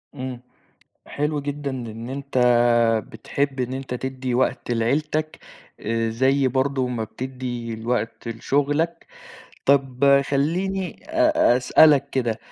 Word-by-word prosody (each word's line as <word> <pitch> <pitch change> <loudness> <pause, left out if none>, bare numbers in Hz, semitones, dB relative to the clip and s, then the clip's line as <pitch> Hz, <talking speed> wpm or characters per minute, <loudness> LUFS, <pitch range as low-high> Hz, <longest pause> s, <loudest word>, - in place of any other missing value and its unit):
امم. 130 -1 -6 0.7
حلو 150 0 -2
جدًا 145 0 -4
إن 115 -3 -6
أنت 140 0 -3 0.7
بتحب 135 +4 -3
إن 125 0 -2
أنت 130 -1 -5
تدّي 130 0 -3
وقت 130 -1 0
لعيلتك 150 +7 -1 0.4
آآ، 115 +1 -1
زي 130 +3 +2
برضه 130 0 0
ما 120 -3 -2
بتدّي 125 -1 -5
الوقت 115 0 -3
لشُغلك. 145 +8 -1 0.6
طَب 140 0 +4
خلّيني 180 +7 -1
أ 310 - +3
أسألك 140 +2 +5
كده، 120 -4 -1
130 Hz, 110 wpm, -23 LUFS, 120-145 Hz, 0.7 s, أسألك